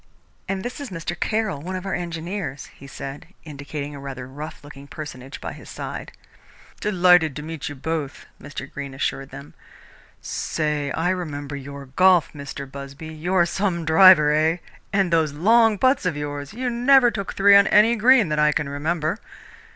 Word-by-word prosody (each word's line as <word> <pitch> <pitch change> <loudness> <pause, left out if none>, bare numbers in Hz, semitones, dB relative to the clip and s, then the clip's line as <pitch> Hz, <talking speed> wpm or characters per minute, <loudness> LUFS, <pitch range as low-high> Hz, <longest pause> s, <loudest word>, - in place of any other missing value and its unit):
"And 190 -1 -2
this 245 - -5
is 280 - -6
Mr. 170 -1 -5
Caroll, 215 -5 -1
one 185 +4 -5
of 185 +1 -5
our 195 - -3
engineers," 170 -3 -5
he 140 - -13
said, 135 +2 -8 0.2
indicating 145 -1 -7
a 140 - -8
rather 135 -2 -7
rough 150 +4 -9
looking 140 -1 -12
personage 135 -3 -8
by - - -6
his - - -13
side. - - -6 0.7
"Delighted 180 -6 +4
to 150 - -6
meet 160 -2 -5
you 145 - -7
both," 150 0 -4 0.2
Mr. 145 -1 -7
Greene 140 -2 -7
assured 135 0 -3
them. 75 +3 -11 0.7
"Say, 150 -2 -2
I 170 +2 0
remember 145 -6 -4
your 140 0 -8
golf, 180 +5 +3
Mr. 140 -1 -7
Busby! 140 +3 -9
You're 175 +3 +1
some 175 -2 -1
driver, 160 -2 +7
eh? 160 +2 +2 0.3
And 195 -3 +1
those 160 -3 +2
long 220 +7 +4
putts 260 -3 +2
of 165 -5 -2
yours 145 -1 -5
you 250 +3 -3
never 245 +1 +5
took 200 -3 -5
three 200 0 +6
on 200 0 +7
any 220 +3 +5
green 235 -3 +5
that 150 0 0
I 150 0 +4
can 150 - -1
remember!" 155 +6 -2
160 Hz, 175 wpm, -23 LUFS, 145-190 Hz, 0.7 s, driver